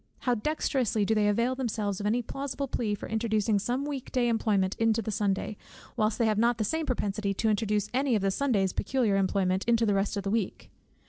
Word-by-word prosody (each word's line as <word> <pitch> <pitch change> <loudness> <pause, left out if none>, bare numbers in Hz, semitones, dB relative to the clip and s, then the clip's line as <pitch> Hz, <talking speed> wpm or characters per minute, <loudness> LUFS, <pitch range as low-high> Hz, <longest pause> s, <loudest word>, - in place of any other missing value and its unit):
How 250 - +1
dexterously 240 -4 0
do 220 - +2
they 210 -1 +2
avail 235 +5 +2
themselves 215 -6 -2
of 205 - -2
any 240 +3 +1
plausible 275 +3 -4
plea 215 -4 -1
for - - -8
introducing 220 -2 +1
some 250 +7 -2
weekday 260 -4 -1
employment 205 -4 +1
into 225 0 +3
the 220 -1 -3
Sunday, 205 0 -1 0.4
whilst 215 -2 +1
they 235 - +2
have 215 -1 +2
not 235 +1 +3
the 220 - 0
same 320 +8 -1
propensity 200 -4 -1
to 220 - +1
introduce 210 -1 0
any 265 -1 +2
of 205 - 0
the 195 - +2
Sunday's 200 -6 +1
peculiar 235 -3 +1
employment 190 -1 +1
into 230 -1 +3
the 205 - +2
rest 195 +1 0
of 200 - -2
the 195 - -2
week! 215 -4 -2
220 Hz, 210 wpm, -28 LUFS, 205-245 Hz, 0.4 s, into